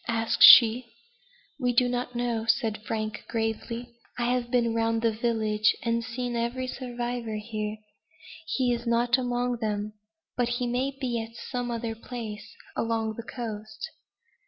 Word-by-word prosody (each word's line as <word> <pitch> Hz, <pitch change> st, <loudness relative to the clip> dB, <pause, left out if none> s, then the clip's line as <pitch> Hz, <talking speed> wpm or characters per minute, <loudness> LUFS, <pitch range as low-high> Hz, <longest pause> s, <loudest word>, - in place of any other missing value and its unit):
asked 225 Hz, -1 st, 0 dB
she. 235 Hz, +1 st, +10 dB, 0.8 s
"We 245 Hz, -2 st, +1 dB
do 245 Hz, +1 st, +4 dB
not 245 Hz, 0 st, -3 dB
know," 235 Hz, -2 st, -1 dB
said 220 Hz, -3 st, +1 dB
Frank, 215 Hz, -1 st, -3 dB
gravely. 230 Hz, +1 st, -3 dB, 0.3 s
"I 240 Hz, 0 st, +1 dB
have 245 Hz, -1 st, -1 dB
been 235 Hz, -2 st, +2 dB
round 225 Hz, 0 st, 0 dB
the 230 Hz, -, +3 dB
village, 215 Hz, -2 st, +1 dB
and 230 Hz, 0 st, 0 dB
seen 245 Hz, 0 st, -4 dB
every 235 Hz, +2 st, -1 dB
survivor 245 Hz, -3 st, -4 dB
here; 215 Hz, 0 st, -4 dB, 0.7 s
he 255 Hz, -6 st, +1 dB
is 235 Hz, 0 st, -4 dB
not 240 Hz, +2 st, +3 dB
among 245 Hz, -1 st, -1 dB
them, 210 Hz, -2 st, -2 dB, 0.4 s
but 245 Hz, -1 st, +1 dB
he 250 Hz, -, -1 dB
may 250 Hz, +3 st, 0 dB
be 240 Hz, -4 st, -1 dB
at 225 Hz, +1 st, -9 dB
some 245 Hz, 0 st, -4 dB
other 230 Hz, -1 st, -3 dB
place 225 Hz, -2 st, -8 dB, 0.2 s
along 225 Hz, -1 st, -1 dB
the 230 Hz, -, -5 dB
coast." 220 Hz, +1 st, -6 dB
235 Hz, 150 wpm, -27 LUFS, 225-245 Hz, 0.8 s, she